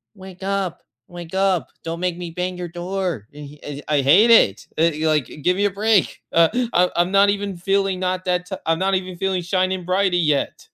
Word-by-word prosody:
"Wake 190 -1 -12
up, 195 -3 -2 0.3
wake 175 -1 -10
up, 190 -3 +1
don't 165 +1 -5
make 180 -1 -2
me 175 -1 -6
bang 180 +1 -4
your 180 -1 -5
door," 175 - -4
e 145 0 -11 0.3
I 150 -2 +2
hate 185 - +5
it, 105 - +4
eh, 160 -1 +1
like, 150 -5 +1 0.2
give 180 +3 +2
me 205 - +1
a - - +3
break, 210 0 +1
uh, 165 -1 +5 0.2
I'm 180 +1 +4
I'm 175 +1 +1
not 200 +1 +5
even 200 -1 -2
feeling 195 +1 0
not 185 0 -2
that 180 -1 -1
ti 190 - -3
I'm 165 0 +1
not 190 +1 +1
even 185 -1 -4
feeling 190 0 -1
shiny 185 +1 0
and 180 -2 -8
brighty 185 -1 +2
yet. 150 -2 -1
180 Hz, 205 wpm, -21 LUFS, 170-195 Hz, 0.3 s, hate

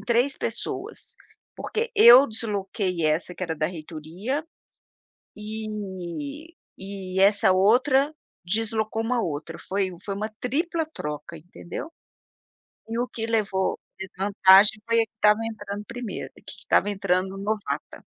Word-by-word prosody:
3 245 +3 +1
pessoas. - - -4 0.4
Porque 455 +1 -3
eu 260 - +9
desloquei 200 - -2
essa 155 +3 0
que 185 - -8
era 165 -2 -2
da 155 0 0
reitoria, 170 - -5 0.9
eh, 215 - -6 0.2
e 190 -1 -5
essa 200 -1 +5
outra 260 +10 +4 0.3
deslocou 220 +3 -1
uma 240 +1 0
outra. 160 -1 -4
Foi 190 -1 -1
foi 200 - -3
uma 215 +2 -3
tripla 320 +6 -1
troca, 150 +2 -6
entendeu? 175 - -8 1.0
E 230 - -3
o 245 - 0
que 225 -2 -5
levou 205 -4 0 0.2
desvantagem 195 +2 +4
foi 230 - +3
a 225 - +1
que - - -47
estava 210 0 +4
entrando 210 -2 -5
primeiro, 245 -3 -6
que - - -18 0.2
estava 205 - +2
entrando 190 -1 0
novata. 205 +1 -4
205 Hz, 125 wpm, -25 LUFS, 185-230 Hz, 1.0 s, eu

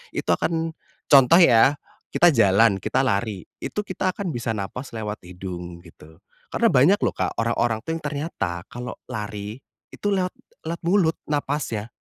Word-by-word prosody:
Itu - - -1
akan 165 -1 0 0.4
contoh 140 +4 +7
ya, 125 0 +6 0.3
kita 175 0 +4
jalan, 105 -4 +4
kita 130 +8 0
lari, 105 -5 -1 0.2
itu - - -4
kita 185 -2 -2
akan 195 -4 -3
bisa 115 -4 -3
nafas 110 +6 -6
lewat 105 -1 -4
hidung 90 -1 -8
gitu. 80 0 -17 0.3
Karena 235 - +3
banyak 155 +11 +5
loh, - - +2
Kak, - - -2
orang-orang 115 -1 0
tuh 160 - -4
yang - - -21
ternyata 140 - -3
kalau 120 0 -6 0.2
lari 105 +1 -5 0.3
itu - - -5
lewat, 185 -2 0 0.4
lewat 170 +1 -4
mulut 175 -3 +3
nafasnya. 140 -7 -2
120 Hz, 155 wpm, -23 LUFS, 100-160 Hz, 0.4 s, contoh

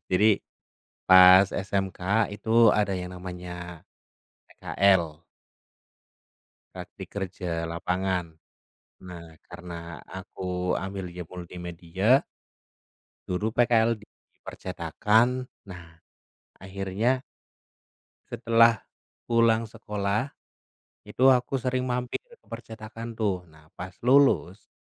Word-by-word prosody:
Jadi, 105 +3 +4 0.7
pas 95 +1 +9
SMK 95 -1 -2 0.3
itu 115 +1 +4
ada 105 -2 +1
yang 90 0 -7
namanya 90 -2 -8 0.6
PKL. 85 -5 +1 1.5
Praktik - - -9
kerja 95 -2 -5 0.3
lapangan. 90 +1 -1 0.8
Nah, 90 -2 -9 0.2
karena 85 -1 -9 0.2
aku 95 0 -11 0.4
ambilnya 95 -2 -6
multimedia 90 +6 0 1.0
dulu 105 +5 -2
PKL 115 -1 +3
di 105 -1 -17 0.4
percetakan. 120 +4 0 0.3
Nah, 85 -2 -12 0.6
akhirnya 100 +7 -2 1.1
setelah 115 0 +4 0.5
pulang 115 -1 +3
sekolah, 105 +2 -3 0.8
itu 130 - 0
aku 125 +2 0
sering 130 0 -1
mampir 125 0 -2
ke 485 -1 -22
percetakan, 115 +1 -9
tuh. 95 -5 -1
Nah, 80 0 -20
pas 95 0 -8
lulus, 125 -7 +3
100 Hz, 85 wpm, -26 LUFS, 90-115 Hz, 1.5 s, pas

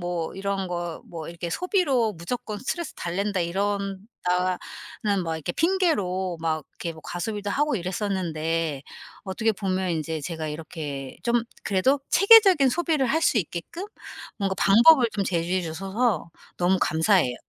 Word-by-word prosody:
뭐 175 -2 -3
이런 195 0 -2
거 175 -1 -3 0.2
뭐 165 -2 -7
이렇게 170 0 -5
"소비로 285 - +1
무조건 210 +5 -5
스트레스 335 +6 -4
달랜다." 195 +3 -2
이런다는 195 +2 -1 1.3
막 165 -1 -2
이렇게 160 +2 -4
핑계로 200 - +1
막 160 -2 -1
이렇게 170 - -5
뭐 160 - -13
과소비도 205 +3 -4
하고 295 +6 +1
이랬었는데 165 -6 -2 0.4
어떻게 215 +3 0
보면 190 -2 -1
인제 160 -1 -2
제가 160 +1 -4
이렇게 150 -3 -6
좀 235 0 +2 0.2
그래도 205 +9 +2
체계적인 395 -9 +7
소비를 315 -1 +1
할 315 +7 +1
수 275 - +3
있게끔 180 - -5 0.5
뭔가 195 -2 0
방법을 240 +5 +6
좀 200 - -1
제시해 180 0 0
주셔서 190 +3 -1 0.3
너무 180 +2 +2
감사해요. 160 -4 +3
190 Hz, 320 characters per minute, -25 LUFS, 170-235 Hz, 1.3 s, 체계적인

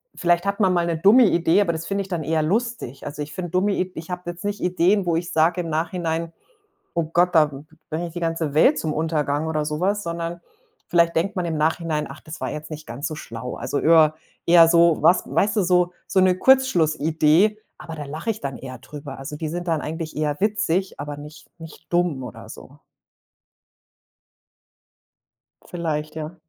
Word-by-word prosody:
vielleicht 175 +1 +1
hat 200 +1 -1
man 190 -3 +3
mal 175 -1 +1
'ne 170 -1 -1
dumme 210 +9 +6
Idee, 175 0 +3
aber 175 -4 +1
das 160 0 -5
finde 200 +2 -1
ich 195 - -6
dann 175 -4 -3
eher 160 +1 0
lustig. 205 - -2
Also, 145 +1 -6
ich 150 0 -6
finde 175 -3 -5
dumme 190 +3 +1
Id 185 -1 -2
ich 160 +2 -8
habe 180 0 -5
jetzt 175 0 -8
nicht 205 0 -3
Ideen, 180 +2 +2
wo 170 -2 +1
ich 170 +1 -3
sage 165 +3 +2
im 165 - -5
Nachhinein: 165 0 -2 0.6
„Oh 170 -1 +1
Gott, 175 +3 +1
da 155 -2 +5 0.4
bringe 170 +3 -3
ich - - -13
die 175 - -6
ganze 165 -3 -2
Welt 260 - +5
zum 155 - -2
Untergang“ 155 -1 -1
oder 155 -1 -1
so 150 +1 -3
was. 200 +3 +1
Sondern 170 0 -4 0.5
vielleicht 170 -1 +3
denkt 195 +6 0
man 180 - -1
im 160 -2 -2
Nachhinein: 155 0 0
„Ach, 140 +3 -11
das 155 - -10
war - - -3
jetzt 150 +1 -7
nicht 155 0 -8
ganz 125 +6 -5
so 155 - -5
schlau.“ 120 -3 -7
Also, 145 - -3
öer 155 -1 +5 0.3
eher 170 -1 +7
so 170 -1 +5
was 180 - +5
weißt 210 +2 +1
du, 205 - +3
so 180 0 +2
so 190 - +2
'ne 185 -1 +4
Kurzschlussidee, 170 - +3 0.2
aber 165 - -8
da 150 - -6
lache 155 +10 -4
ich 215 - -4
dann 135 -2 -4
eher 130 -1 -8
drüber. 140 +1 -9
Also, 135 +2 -7
die 155 +1 -4
sind 175 +3 -5
dann 160 -2 +1
eigentlich 160 +1 -5
eher 150 -1 -1
witzig, 195 -4 0
aber 145 0 -5
nicht 150 +2 -12
nicht 160 0 -12
dumm 175 -6 +1
oder 125 - -9
so. - - -13 2.8
Vielleicht, 155 -3 -4
ja. 160 +2 -6
165 Hz, 200 wpm, -23 LUFS, 155-180 Hz, 2.8 s, eher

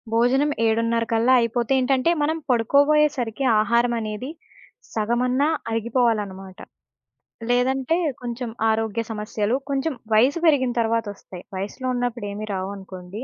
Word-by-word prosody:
భోజనం 260 +6 +3 0.2
ఏడున్నరకల్లా 230 +2 +2
అయిపోతే 235 +1 -1
ఏంటంటే 265 +4 +2
మనం 310 +2 +1
పడుకోబోయే 285 +6 +4
సరికి 240 +1 -3 0.2
ఆహారమనేది 235 0 0 0.6
సగమన్నా 245 +5 +1 0.2
అరిగిపోవాలనమాట. 220 -5 -1 0.9
లేదంటే 260 +5 +1 0.2
కొంచెం 240 0 -4 0.2
ఆరోగ్య 220 0 0
సమస్యలు, 210 +1 -2
కొంచెం 280 +3 -1 0.2
వయసు 255 +9 +4
పెరిగిన 275 -6 +3
తరువాతొస్తాయి. 220 -5 -3
వయస్సులో 205 +7 -4
ఉన్నప్పుడు 245 -2 -2
ఏమి 210 +2 -5
రావనుకోండి. 190 +1 -6
235 Hz, 100 wpm, -23 LUFS, 215-255 Hz, 0.9 s, పడుకోబోయే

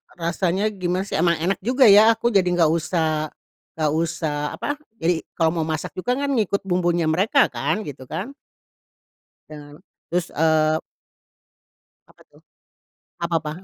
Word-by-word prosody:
rasanya, 185 +4 -1
gimana 185 -1 -2
sih, 200 - -3
emang 170 0 +3
enak 175 +4 -1
juga 250 +6 +2
ya. 215 +2 +7
Aku 235 +1 0
jadi 195 -3 +3
enggak 175 -3 +3
usah 160 -2 0 0.5
enggak 155 -2 0
usah, 155 -2 -2
apa, 290 - -3 0.2
jadi 165 0 +1 0.2
kalau 165 -2 +2
mau 155 - -1
masak 155 -1 -3
juga 185 +7 -2
kan 280 +1 -2
ngikut 205 -3 0
bumbunya 175 -2 +1
mereka 195 - +3
kan, 215 - -2
gitu 135 -2 -8
kan. 190 - -5 1.2
Iya 155 - -8
kan. 145 - -14 0.3
Terus, 175 0 0
eee 155 0 +3 1.3
Apa - - -23
tuh? - - -22 0.8
Apa 170 0 -1
apa? 150 - -4
175 Hz, 150 wpm, -22 LUFS, 160-200 Hz, 1.3 s, ya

